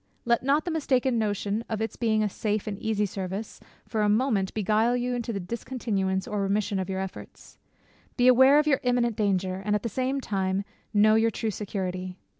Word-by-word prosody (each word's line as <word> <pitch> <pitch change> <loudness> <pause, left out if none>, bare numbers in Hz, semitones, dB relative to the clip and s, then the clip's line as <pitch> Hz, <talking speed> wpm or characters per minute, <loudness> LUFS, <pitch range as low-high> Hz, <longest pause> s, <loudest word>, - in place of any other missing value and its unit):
Let 235 0 +2
not 280 +4 +2
the 350 - -2
mistaken 260 -6 +1
notion 205 0 -1
of 220 - -2
its 225 0 -3
being 220 -2 +1
a - - +2
safe 210 +1 -2
and 210 - -3
easy 215 -2 0
service, 195 +2 -5 0.3
for 220 - -1
a 210 - +3
moment 210 -3 +1
beguile 220 +3 +2
you 245 0 -1
into 240 -1 -3
the 200 - -3
discontinuance 195 -2 -2
or 210 -1 -2
remission 200 0 0
of 190 0 -3
your 190 0 -2
efforts. 190 -1 -9 0.6
Be 245 -1 +4
aware 260 +3 +7
of 300 - +4
your 290 -3 +3
imminent 245 -2 +1
danger, 190 -3 0
and 210 +1 +1
at 210 - -2
the 230 - -2
same 260 +3 -1
time 195 -5 -1 0.3
know 215 0 +5
your 225 +1 +4
true 225 0 -2
security. 185 -3 -4
215 Hz, 200 wpm, -27 LUFS, 195-240 Hz, 0.6 s, aware